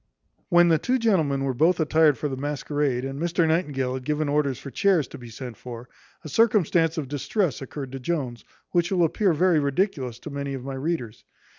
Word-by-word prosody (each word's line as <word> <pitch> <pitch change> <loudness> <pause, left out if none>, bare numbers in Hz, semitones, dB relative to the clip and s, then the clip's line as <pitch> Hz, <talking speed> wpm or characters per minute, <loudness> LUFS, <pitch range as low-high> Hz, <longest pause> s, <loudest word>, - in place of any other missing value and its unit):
When 175 -1 +5
the 160 -2 +4
two 255 +9 +1
gentlemen 160 - +1
were 135 -1 0
both 160 +9 +3
attired 155 -3 +4
for 150 - -2
the 135 - -3
masquerade, 145 -2 -1
and 135 +1 -5
Mr 170 -1 +1
Nightingale 145 -6 0
had 130 0 -5
given 150 +2 -1
orders 145 -3 +1
for 140 +1 -9
chairs 180 -7 +2
to - - -10
be 120 -1 -10
sent 120 0 -8
for, 120 0 -9 0.3
a - - -7
circumstance 170 - +2
of 150 -4 -2
distress 150 - -1
occurred 135 0 -6
to 135 - -6
Jones, 130 -4 -3 0.3
which 175 0 +1
will 180 -2 +3
appear 190 +4 +2
very 170 +1 +3
ridiculous 140 - -1
to 155 - -7
many 140 -1 -4
of 130 - -7
my 135 - -4
readers. 135 -5 -3
150 Hz, 200 wpm, -25 LUFS, 135-170 Hz, 0.3 s, When